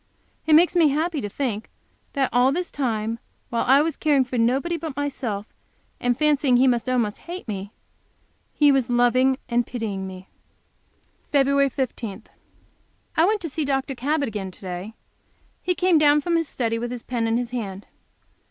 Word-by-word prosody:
It 315 - +4
makes 345 +3 +5
me 335 -3 +5
so 280 - +1
happy 320 -1 -1
to 205 - -4
think 225 -2 -3 0.4
that 270 -3 0
all 250 +2 +4
this 355 +4 -2
time, 230 -4 -2 0.3
while 235 - 0
I 270 +3 +6
was 325 0 -2
caring 290 -4 +3
for 255 0 -6
nobody 260 +9 +1
but 320 -4 -5
myself, 255 -8 -3 0.5
and 245 -1 +1
fancying 290 -4 +3
He 260 +2 +4
must 245 0 +1
almost 235 -5 0
hate 360 -4 -6
me, 200 -1 -5 0.8
He 295 -1 +4
was 270 -3 +1
loving 250 +2 +3
and 240 0 +1
pitying 205 -6 -4
me. 185 0 -10 1.0
Feb. 280 -1 +3
15. 235 -5 -4 0.9
I 320 - +5
went 420 +1 +1
to 335 - -3
see 310 +3 -2
Dr. 270 -1 -1
Cabot 280 +3 -1
again 205 -4 -4
to 185 - -12
day. 185 +3 -6 0.7
He 360 - 0
came 360 -3 +3
down 295 0 +5
from 340 +2 0
his 330 -2 +1
study 230 -4 -2
with 240 +1 -3
his 245 -1 -6
pen 235 -2 -1
in 225 +1 +1
his 245 -1 -3
hand. 205 -5 -5
255 Hz, 180 wpm, -23 LUFS, 230-290 Hz, 1.0 s, I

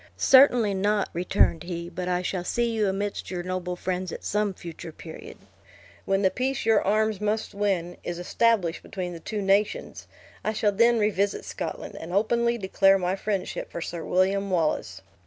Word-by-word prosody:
"Certainly 250 -6 +6
not," 205 +1 +1
returned 170 -2 +2
he; 170 -1 -5
"but 180 +1 -5
I 180 0 0
shall 180 -1 -2
see 235 +6 0
you 215 -3 +1
amidst 200 +1 -3
your 180 -2 -4
noble 180 0 -3
friends, 180 0 -3
at - - -7
some 210 0 0
future 170 -2 -9
period. 160 0 -10 0.7
When 195 +1 +1
the 190 - +4
peace 260 -1 -2
your 225 -2 +4
arms 215 0 +1
must 210 +1 -1
win, 190 -4 -1
is 175 - -4
established 180 -1 +1
between 180 -2 -5
the 170 - -8
two 205 +5 -4
nations, 205 - 0 0.4
I 215 - 0
shall 210 -1 +2
then 235 +3 +4
revisit 205 -2 0
Scotland; - - -6
and 165 - -8
openly 235 +4 +2
declare 195 -1 +4
my 185 0 -1
friendship 195 -1 -3
for - - -5
Sir 170 0 -5
William 195 +2 +1
Wallace." 165 -4 -1
195 Hz, 175 wpm, -26 LUFS, 180-215 Hz, 0.7 s, Certainly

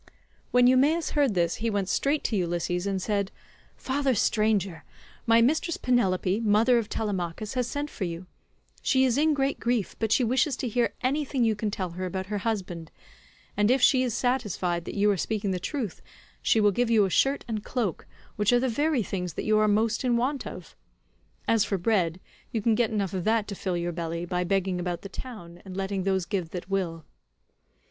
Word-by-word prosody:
When 250 0 +4
Eumaeus 285 +6 +3
heard 280 -8 +2
this 170 -1 +1
he 230 +1 -1
went 200 -3 -1
straight 280 +9 +1
to 225 - -1
Ulysses 175 0 -1
and 195 -1 -1
said, 200 0 -1 0.4
"Father 270 -1 0
stranger, 205 -6 +1 0.4
my 230 0 +6
mistress 315 +6 +1
Penelope, 195 -5 +1
mother 230 +3 +4
of 220 - -5
Telemachus, 200 0 -3
has 250 -2 0
sent 285 +3 -3
for 225 - -6
you; 170 +1 -5 0.6
she 265 -1 +3
is 245 -3 +2
in 305 +2 +3
great 275 0 0
grief, 235 -4 -1
but 220 -1 -1
she 255 - +4
wishes 255 +3 +1
to 255 - -2
hear 235 -2 0
anything 270 -1 0
you 225 -2 +2
can 210 +1 -2
tell 190 -4 -3
her 185 +2 -4
about 190 +1 -4
her 205 +1 -3
husband, 185 -7 -3 0.7
and 205 +1 +2
if 260 +2 +4
she 260 +1 +5
is 245 -3 -1
satisfied 210 -9 -1
that - - -6
you 205 0 +3
are 200 - 0
speaking 200 +3 -1
the 185 - -1
truth, 225 - -4 0.4
she 225 - +3
will 210 -1 +4
give 240 +4 0
you 220 -3 +5
a 190 - -3
shirt 275 +8 +2
and 215 -3 -3
cloak, 225 -9 -2 0.3
which 210 +1 +2
are 245 - +5
the 260 - 0
very 290 +1 +1
things 180 -3 -4
that - - -4
you 215 0 +3
are 215 - +3
most 220 +3 +1
in 245 -2 +2
want 265 +3 -1
of. 175 - -9 0.7
As 225 -2 +4
for 200 - -1
bread, 180 -3 +1 0.3
you 225 - -1
can 225 +2 +2
get 230 0 +2
enough 200 -4 -2
of 185 -2 -2
that 220 -1 +2
to - - -3
fill 185 -2 -2
your 175 0 -2
belly, 170 0 -4
by 180 +1 -1
begging 190 -1 0
about 175 -1 -3
the 195 - -7
town, 190 -8 -9
and 190 -1 -8
letting 195 -1 -2
those 190 -2 +1
give 185 -5 -2
that 180 +2 -7
will." 170 -5 -2
210 Hz, 205 wpm, -27 LUFS, 185-245 Hz, 0.7 s, my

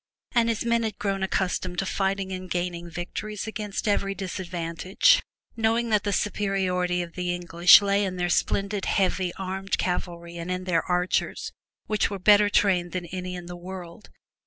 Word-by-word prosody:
And 235 -2 +3
his 230 0 -1
men 235 0 +2
had 220 -3 -3
grown 195 -1 -2
accustomed 185 -1 -1
to 195 - 0
fighting 195 0 -1
and 185 0 -6
gaining 175 -1 -3
victories 200 +5 -5
against 215 -1 -4
every 195 -1 +1
disadvantage. 185 - +1 0.3
Knowing 230 +1 +1
that 210 -1 +2
the 205 - +1
superiority 185 -3 0
of 170 -1 -10
the 180 -1 -2
English 175 +2 +6
lay 200 0 +2
in 190 -2 -2
their 180 -1 -1
splendid 200 +3 0
heavy 185 -2 +1
armed 190 0 -2
cavalry 170 -1 -3
and 170 +1 -5
in 180 0 -2
their 175 -3 +1
archers, 180 0 0 0.3
which 215 -2 +1
were 200 - -4
better 205 +2 +5
trained 180 -4 +2
than 180 -1 -3
any 180 +1 -5
in 175 -1 -7
the 175 0 -7
world. 180 +1 -9
185 Hz, 170 wpm, -26 LUFS, 180-205 Hz, 0.3 s, English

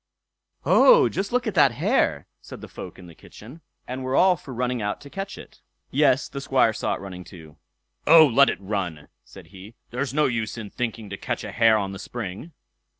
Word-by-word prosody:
"Oh, 485 -5 +6
just 195 +1 -3
look 250 +1 0
at 220 - -2
that 145 -7 +4
hare!" - - 0 0.2
said - - -11
the - - -9
folk - - -10
in 90 - -13
the 85 - -13
kitchen, 125 - -14 0.3
and 130 +1 -5
were 130 +1 -2
all 185 +3 +5
for 145 -4 -12
running 125 -1 -2
out 105 0 -3
to 140 - -13
catch 195 0 -6
it. - - -14 0.3
Yes, 140 -1 +2
the 140 - -7
Squire 130 -4 +2
saw - - -2
it - - -9
running 90 -2 -8
too. 80 -5 -14 0.5
"Oh, 160 +1 +9
let 140 +1 +4
it - - -3
run", 95 -6 -4
said - - -15
he; 100 +4 -12 0.2
"there's 125 +2 -3
no 150 +2 +2
use 115 -3 -2
in 105 -3 -8
thinking 115 -4 -5
to 100 - -5
catch - - -4
a - - -6
hare 115 -1 +4
on 100 -2 -3
the 95 - -8
spring." 115 - -7
120 Hz, 210 wpm, -24 LUFS, 100-145 Hz, 0.5 s, Oh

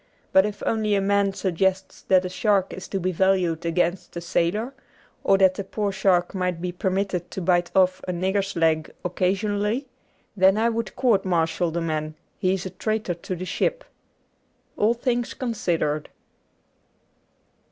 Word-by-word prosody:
But 190 +2 +6
if 205 -1 -7
once 220 -1 0
a - - +3
man 200 0 +2
suggests 190 0 -1
that 185 -1 +4
a - - -2
shark 195 0 +1
is 190 - -7
to 195 - -2
be 185 +1 0
valued 180 -2 +1
against 175 +1 -1
a - - -1
sailor, 185 +8 0 0.5
or 195 - +4
that 190 -1 +5
the 200 - -5
poor 205 +1 -2
shark 180 -2 +2
might 180 -3 -1
be 180 +1 -3
permitted 185 0 -2
to - - -5
bite 175 -1 +2
off 185 -1 +3
a - - 0
nigger's 190 +3 -1
leg 160 -2 +2 0.2
occasionally, 205 +7 0 0.5
then 190 +1 +5
I 230 +2 +3
would 230 -2 -3
court 240 -7 +3
martial 170 -1 +1
the 170 +1 -2
man 155 -1 -2
— - - -43
he 185 +1 +2
is 190 - -5
a 185 - -5
traitor 215 -4 -2
to 175 +2 -5
the 180 +1 -5
ship. - - -1 0.9
^All 225 +3 +2
Things 240 -1 -1
Considered. 170 - -1
190 Hz, 165 wpm, -24 LUFS, 175-205 Hz, 0.9 s, But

